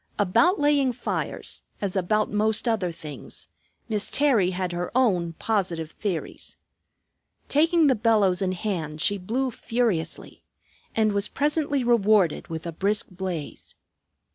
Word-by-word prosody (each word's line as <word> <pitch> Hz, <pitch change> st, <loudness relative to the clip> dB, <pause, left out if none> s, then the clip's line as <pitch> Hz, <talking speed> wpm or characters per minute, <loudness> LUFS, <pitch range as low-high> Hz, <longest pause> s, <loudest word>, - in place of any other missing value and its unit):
About 275 Hz, -, +3 dB
laying 285 Hz, -3 st, +3 dB
fires, 240 Hz, -, -4 dB, 0.2 s
as 200 Hz, -2 st, -3 dB
about 210 Hz, +3 st, +1 dB
most 215 Hz, +3 st, +1 dB
other 205 Hz, -6 st, +1 dB
things, 145 Hz, -, -9 dB, 0.4 s
Miss 215 Hz, -2 st, +1 dB
Terry 255 Hz, -11 st, +3 dB
had 185 Hz, -1 st, -2 dB
her 175 Hz, 0 st, -3 dB
own 180 Hz, -10 st, +2 dB
positive 175 Hz, -5 st, -1 dB
theories. 190 Hz, -7 st, -4 dB, 0.9 s
Taking 325 Hz, +3 st, +4 dB
the 275 Hz, -, +5 dB
bellows 210 Hz, -5 st, +2 dB
in 185 Hz, -1 st, 0 dB
hand 170 Hz, -6 st, -3 dB
she 200 Hz, +5 st, +2 dB
blew 250 Hz, +8 st, -1 dB
furiously, 225 Hz, -10 st, -2 dB, 0.5 s
and 220 Hz, -1 st, +3 dB
was 200 Hz, 0 st, 0 dB
presently 290 Hz, -2 st, 0 dB
rewarded 215 Hz, -7 st, +3 dB
with 160 Hz, 0 st, -6 dB
a 170 Hz, -, -3 dB
brisk 200 Hz, +6 st, 0 dB
blaze. 180 Hz, -5 st, -6 dB
205 Hz, 130 wpm, -25 LUFS, 180-240 Hz, 0.9 s, the